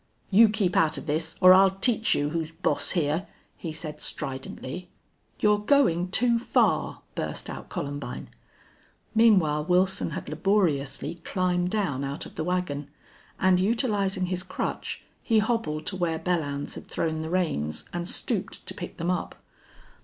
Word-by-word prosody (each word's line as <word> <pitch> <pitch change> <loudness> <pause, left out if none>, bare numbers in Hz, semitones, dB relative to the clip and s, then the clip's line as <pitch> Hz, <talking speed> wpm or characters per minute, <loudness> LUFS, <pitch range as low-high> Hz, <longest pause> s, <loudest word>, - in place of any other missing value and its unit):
"You 220 +3 +7
keep 205 -4 0
out 155 -1 +3
of - - -7
this 160 +1 -1
or 185 0 +9
I'll 190 +1 +7
teach 220 +4 +3
you 145 0 0
who's 165 -1 -2
boss 165 +2 0
here," 160 +3 0 0.3
he 165 - -6
said, 155 -1 -5
stridently. 135 +4 -5 0.5
"You're 210 -1 +4
going 210 -7 +3
too 235 +4 +3
far!" 235 - +1
burst - - -3
out - - -8
Columbine. 145 0 -5 0.8
Meanwhile 185 -10 +4
Wilson 185 +2 +2
had 150 - -6
laboriously 155 -3 0
climbed 180 -1 0
down 180 -11 -1
out 140 +1 -4
of - - -11
the - - -3
wagon, 165 -5 -2 0.5
and, 185 -1 +4
utilizing 200 -3 +1
his 180 0 -2
crutch, - - -4 0.2
he 225 - +2
hobbled 215 -9 0
to 190 - -2
where 170 -3 0
Belllounds 160 -4 -2
had - - -9
thrown 160 -1 -2
the 160 - -4
reins, 155 - -1
and 175 0 -3
stooped - - -2
to - - -5
pick - - -8
them 175 +1 -1
up. 180 - -3
180 Hz, 155 wpm, -26 LUFS, 155-195 Hz, 0.8 s, or